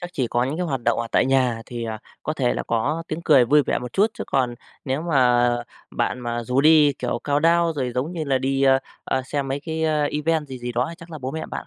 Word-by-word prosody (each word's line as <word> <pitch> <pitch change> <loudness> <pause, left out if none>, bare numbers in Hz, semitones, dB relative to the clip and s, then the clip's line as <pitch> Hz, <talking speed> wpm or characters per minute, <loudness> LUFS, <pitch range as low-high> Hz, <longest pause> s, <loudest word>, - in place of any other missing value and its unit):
chắc 175 -1 -6
chỉ 130 -7 -1
có 120 +1 0
những 140 +4 -3
cái 180 0 -2
hoạt 135 -4 -2
động 120 0 +2
ở 115 - -3
tại - - +3
nhà 130 -4 +1
thì, 120 -1 -5
à, 110 -1 -4 0.2
có 155 - -2
thể 130 -5 0
là - - -2
có 140 +8 -1
tiếng 160 +2 -4
cười 140 -7 +5
vui 145 +4 +4
vẻ - - -1
một 125 -1 -7
chút, 210 +3 +3
chứ - - -5
còn 125 -3 0 0.3
nếu 135 +2 -2
mà 125 -7 +3 0.4
bạn 125 - -2
mà 120 0 -3
rủ 125 +3 +1
đi, 150 -1 +6
kiểu, 125 - -3
countdown, 165 +3 +3
rồi 130 -5 -3
giống 135 +7 -2
như 165 -3 -3
là 135 -2 +1
đi, 135 +1 0
ơ, 135 -1 +5 0.3
ơ, 130 - -1
xem 140 +1 -3
mấy 135 +1 -2
cái, 160 +1 -3
a, 155 -2 +1
event 155 +1 0
gì 130 -1 -7
gì 120 0 -5
đó 120 +1 0
thì - - -8
chắc 170 0 -13
là 155 - -7
bố 130 -1 -4
mẹ 160 +2 -5
bạn - - -5
135 Hz, 275 wpm, -23 LUFS, 125-155 Hz, 0.4 s, đi